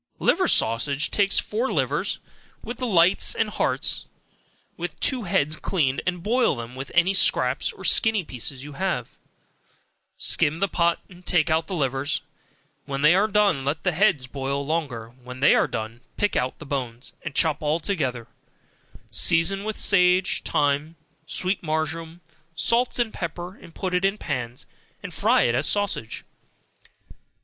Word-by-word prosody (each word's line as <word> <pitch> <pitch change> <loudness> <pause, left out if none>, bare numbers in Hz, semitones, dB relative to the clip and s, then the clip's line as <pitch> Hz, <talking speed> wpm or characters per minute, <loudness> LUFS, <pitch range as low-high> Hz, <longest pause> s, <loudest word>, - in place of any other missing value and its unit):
Liver - - +2
Sausage 135 +6 +1
Take 200 -1 +2
four 230 +7 0
livers, - - 0 0.5
with 240 - -6
the 255 - -2
lights 180 -3 +3
and - - 0
hearts, - - -1 0.7
have - - -5
two 255 -5 0
heads 155 -3 +1
cleaned, 140 -8 0
and 180 -2 -2
boil 240 - +2
them 120 0 -7
with 135 +1 -7
any 175 +3 +4
scraps, 190 - +2
or - - -13
skinny 220 -4 +4
pieces 130 -1 -5
you 145 0 -9
have, 170 -8 -3 1.0
skim 155 +3 +2
the 200 - +2
pot, 170 -2 +1 0.2
take 165 -2 +2
out 160 0 +1
the 190 - -4
livers 140 +1 -1 0.6
when 140 0 -4
they 155 +3 +7
are 200 +4 +3
done, 210 -6 +3
and 135 - -7
let 150 +2 -2
the 180 - +2
heads 165 -6 +2
boil 140 +2 -3
longer, 140 -8 -3
when 125 +1 -9
they 145 - +5
are - - +3
done, 115 0 -5 0.2
pick 205 - 0
out 125 +1 -1
the - - -10
bones, 125 -3 -4
and 155 -2 -7
chop 160 -4 +1
all 155 +2 0
together, 130 - -2 0.8
season 180 +4 +3
with 215 0 -4
sage, 180 -1 +4
thyme, 145 +2 0 0.3
sweet 180 +6 0
marjoram, 160 +1 -3 0.3
salt 230 +10 +2
and 240 -3 0
pepper, 175 +2 -6 0.2
put 185 -2 -3
it 180 +1 +1
in 195 +2 +1
pans, 120 - -4 0.4
and - - -7
fry - - +3
it 120 - +2
as 120 - +1
sausage. 205 - -1
160 Hz, 155 wpm, -24 LUFS, 135-190 Hz, 1.0 s, they